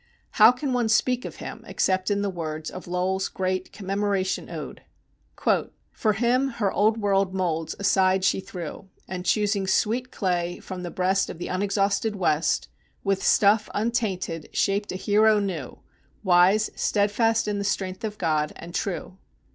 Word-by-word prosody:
How 220 +2 +7
can 255 +1 -3
one 240 -3 +1
speak 250 +3 +2
of - - -6
him - - -8
except 185 0 0
in 200 0 +1
the 200 - 0
words 155 -3 -5
of 185 - -9
Lowell's 185 +2 -1
great 185 0 -2
"Commemoration 195 -1 -1
Ode": - - -7 1.1
"For 215 -2 +1
him 245 +5 +2
her 205 -4 +1
Old 215 +2 +2
World 195 -3 +1
moulds 165 -4 -1
aside 190 -1 +2
she 190 - +2
threw, 185 +1 -8 0.2
And, 185 -1 -5
choosing 205 -2 +1
sweet 235 +6 +1
clay 175 -2 -1
from 185 -2 -7
the 175 - -5
breast 190 +2 +1
Of - - -7
the 175 - -5
unexhausted 200 +2 0
West, 165 -5 +1 0.4
With 195 -1 0
stuff 210 +1 +4
untainted 205 -7 -2
shaped 200 +1 0
a - - -4
hero 210 +2 +3
new, 180 -10 -4 0.5
Wise, 190 +3 +4
steadfast 215 +2 +1
in 205 -1 -1
the - - -2
strength 190 -1 -2
of 210 -1 -4
God, 155 -4 0
and 170 +1 -10
true. 190 -1 -4
195 Hz, 155 wpm, -25 LUFS, 185-210 Hz, 1.1 s, How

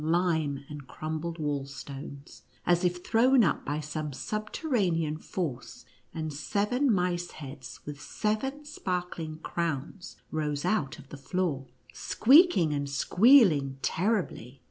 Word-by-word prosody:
lime 160 -4 +1
and 145 -3 -9
crumbled 160 +4 -4
wall 145 -3 -1
stones, 140 0 -9 0.2
as 175 +1 +3
if 180 0 -1
thrown 245 +2 +5
up 170 - +1
by 145 +1 -2
some 150 0 -4
subterranean 200 - -1
force, 155 -4 -5 0.3
and 155 -2 -4
seven 210 - +1
mice 180 -3 0
heads 135 -3 -9
with 150 0 -7
seven 265 - -2
sparkling 180 - -4
crowns 170 +3 -3 0.2
rose 150 -1 -2
out 180 -9 0
of 140 - -14
the 145 - -8
floor, 140 -2 -2 0.3
sqeaking 245 - +5
and 140 0 -2
squealing 165 - +5
terribly. 175 - -1
165 Hz, 120 wpm, -29 LUFS, 145-200 Hz, 0.3 s, thrown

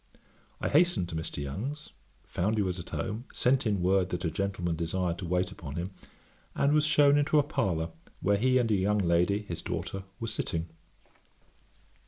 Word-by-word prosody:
I - - -1
hastened 150 - +3
to 85 - -5
Mr. 80 0 -4
Young's, 130 - -5 0.3
found 105 +5 -1
he 105 - +3
was 90 -1 -2
at 85 - -8
home, 110 +4 -3
sent 125 -1 +2
in 100 -4 0
word 95 0 +3
that 90 0 -3
a 80 - 0
gentleman 90 -1 -1
desired 85 +1 -1
to 90 - -4
wait 90 +2 0
upon 75 -7 -8
him, 90 +3 -3 0.6
and 140 +1 +3
was 150 0 +4
shewn 145 -1 +5
into 150 +1 +2
a 145 - +6
parlour, 85 - -1 0.3
where 100 +1 +2
he 130 +4 +3
and 120 -3 +2
a - - +4
young 100 +2 +2
lady, 90 +2 +2
his 85 -5 -5
daughter, 90 +3 -4
were 115 - -3
sitting. 85 -6 -3
95 Hz, 185 wpm, -29 LUFS, 85-115 Hz, 0.6 s, a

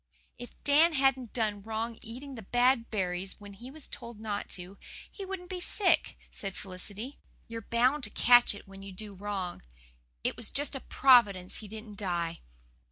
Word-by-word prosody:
"If 245 - -9
Dan 310 +4 +6
hadn't 265 -4 +2
done 215 -4 0
wrong 225 +2 -3
eating 260 +5 -7
the 235 - -7
bad 245 +3 +3
berries 190 -2 -2
when 205 -1 -10
he 240 +6 -10
was 295 +1 -5
told 235 -5 -8
not 210 -2 -3
to, 180 +2 -10 0.3
he 395 - -7
wouldn't 375 -2 -6
be 365 - -3
sick," 365 -2 +3
said 195 -1 -4
Felicity. 205 +7 -6 0.3
"You're 230 0 -5
bound 250 +6 +2
to - - -4
catch 240 -1 +6
it 205 - -12
when 195 0 -11
you 195 0 -8
do 205 +2 -7
wrong. 195 -2 -4 0.6
It - - 0
was 235 - -2
just 290 +1 0
a 270 - -2
Providence 210 -10 +4
he 215 - -8
didn't 215 -1 -9
die." 170 -4 -1
225 Hz, 175 wpm, -30 LUFS, 200-260 Hz, 0.6 s, Dan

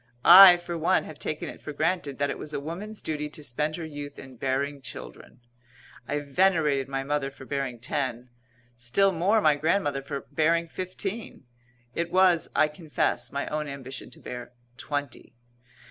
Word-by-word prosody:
I, 180 0 +11
for 175 0 -6
one, 175 +4 +2
have 155 - -10
taken 155 - -4
it - - -9
for 150 - -6
granted 155 -2 -1
that 140 0 0
it - - -6
was 150 0 -6
a - - -1
woman's 185 +9 -7
duty 150 -1 -3
to 150 0 -11
spend 150 +4 -2
her 170 - -5
youth 145 -2 -8
in 135 -1 -11
bearing 135 +3 -2
children. 125 -1 -9 0.7
I 145 +1 -1
venerated 150 -3 +2
my 135 0 -3
mother 145 0 -1
for 135 -1 -13
bearing 135 -3 -3
ten; 125 -1 -3 0.4
still 120 +12 +2
more 190 +6 +2
my 155 -5 +5
grandmother 145 -2 0
for 140 0 -5
bearing 165 +2 +2
fifteen; 185 +1 -6 0.5
it 170 0 -2
was, 185 -3 +4
I 155 - +5
confess, 150 0 -2
my 140 0 -2
own 150 0 -2
ambition 135 -1 -7
to - - -15
bear 125 0 -8 0.2
twenty. 145 -3 -5
150 Hz, 170 wpm, -27 LUFS, 135-170 Hz, 0.7 s, I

